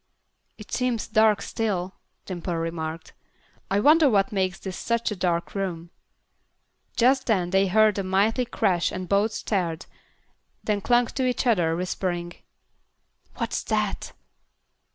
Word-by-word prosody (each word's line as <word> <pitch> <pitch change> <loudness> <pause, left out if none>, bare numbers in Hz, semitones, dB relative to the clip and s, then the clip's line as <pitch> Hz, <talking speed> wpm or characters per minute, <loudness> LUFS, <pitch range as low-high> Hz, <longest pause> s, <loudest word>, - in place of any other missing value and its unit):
"It 215 - -12
seems 250 -3 -1
dark 215 -1 +3
still," 190 -4 -2 0.3
Dimple 175 -1 -4
remarked. 165 -1 -4 0.6
"I 195 - +2
wonder 300 +5 +6
what 200 -4 +2
makes 190 -2 -1
this 190 -2 -6
such 235 -1 -1
a - - -2
dark 175 -2 -1
room." 175 -4 -4 1.1
Just 260 +3 +3
then 185 -6 +1
they 195 +1 +3
heard 215 +2 +3
a - - -1
mighty 205 +6 +1
crash 180 -7 0
and 185 -1 -5
both 200 +3 +2
started, 175 -7 -2 0.8
then 210 -1 0
clung 240 +3 +3
to 260 +2 -2
each 250 - -1
other, 175 -9 +2
whispering, 175 -1 -3 1.0
"What's - - -2
that?" - - -2
195 Hz, 130 wpm, -25 LUFS, 175-225 Hz, 1.1 s, wonder